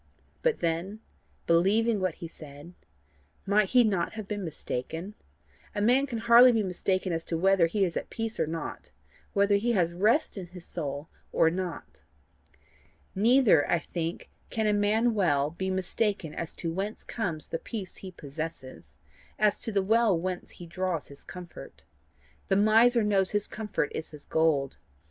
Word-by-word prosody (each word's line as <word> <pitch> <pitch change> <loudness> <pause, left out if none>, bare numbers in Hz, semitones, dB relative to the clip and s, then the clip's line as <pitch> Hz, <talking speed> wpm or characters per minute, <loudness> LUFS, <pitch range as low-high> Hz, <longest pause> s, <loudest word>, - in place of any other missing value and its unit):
But 485 -2 +1
then: 170 +6 -2 0.5
believing 205 +6 +3
what 185 -3 -1
he 170 - -7
said, 150 +1 -12 0.7
might 200 0 +3
he 250 -1 +6
not 195 -6 0
have 215 -2 -7
been 205 -1 -3
mistaken? 165 +3 -5 0.6
A 205 - -1
man 255 +5 +4
can 240 -4 -4
hardly 235 +2 +7
be 225 -3 +1
mistaken 185 0 -1
as 165 0 -2
to 165 - -2
whether 190 -1 +4
he 195 +3 +1
is 170 - -4
at - - -4
peace 225 -1 -4
or - - +1
not 165 +1 -6 0.4
whether 200 0 +3
he 235 +4 0
has 170 -5 +1
rest 215 - +2
in 180 - -7
his 180 0 -12
soul 145 -2 -5 0.2
or 160 - +3
not. 180 -1 -5 1.1
Neither 225 - +4
I 175 - +4
think 165 0 -5 0.2
can 220 -1 -1
a 210 - +3
man 215 +3 +2
well 150 -8 +2
be 190 +3 -3
mistaken 190 -2 -1
as 170 +1 -4
to 165 -1 -4
whence 200 +4 -4
comes 170 -10 -4
the 165 - -3
peace 200 -5 -6
he 190 - -8
possesses, 155 -4 -8 0.4
as 210 -1 +2
to 230 - -4
the 200 -2 +1
well 220 -2 +3
whence 180 +1 -4
he 175 - -10
draws 175 -1 -3
his 140 0 -14
comfort. 180 -2 -11 0.6
The 195 - +2
miser 225 +3 +5
knows 195 -3 +2
his 205 -1 -1
comfort 210 -8 -3
is 160 - -5
his 150 -2 -12
gold. 155 -4 +1
190 Hz, 165 wpm, -28 LUFS, 165-215 Hz, 1.1 s, hardly